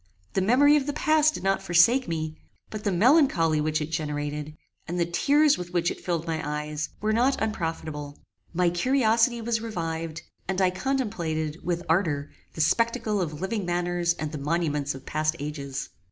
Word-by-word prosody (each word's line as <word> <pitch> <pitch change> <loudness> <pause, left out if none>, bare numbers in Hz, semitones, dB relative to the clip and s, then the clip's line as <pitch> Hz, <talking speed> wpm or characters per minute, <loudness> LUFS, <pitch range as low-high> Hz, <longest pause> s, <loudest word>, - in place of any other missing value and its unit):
The 190 - +1
memory 265 +9 +5
of 280 -1 -2
the 290 - -1
past 310 0 +3
did - - -6
not 195 0 +1
forsake 200 +10 +4
me; 160 -2 -3 0.4
but 215 -1 -6
the 205 - +1
melancholy 180 - +4
which 155 0 0
it 150 +1 -4
generated, 150 0 -3 0.3
and 175 +1 -3
the 170 - +3
tears 290 - +3
with 175 0 -7
which 170 -1 +1
it - - -8
filled 170 -2 -1
my 160 -2 -2
eyes, 150 +1 -3
were 215 +1 +1
not 250 +5 +2
unprofitable. 160 -8 -3 0.3
My 175 0 +2
curiosity 235 +3 +2
was 225 -1 -1
revived, 165 -6 -4 0.2
and 190 0 -1
I 185 -1 +3
contemplated, 175 - -2
with 175 0 -1
ardour, 160 -4 +1 0.2
the 160 - -3
spectacle 225 +3 +1
of 155 -2 -4
living 200 +2 -2
manners 175 0 0
and 155 -1 -4
the 150 - -5
monuments 150 -2 -1
of 135 - -11
past 155 +1 0
ages. 140 -3 -5
175 Hz, 175 wpm, -26 LUFS, 155-220 Hz, 0.4 s, memory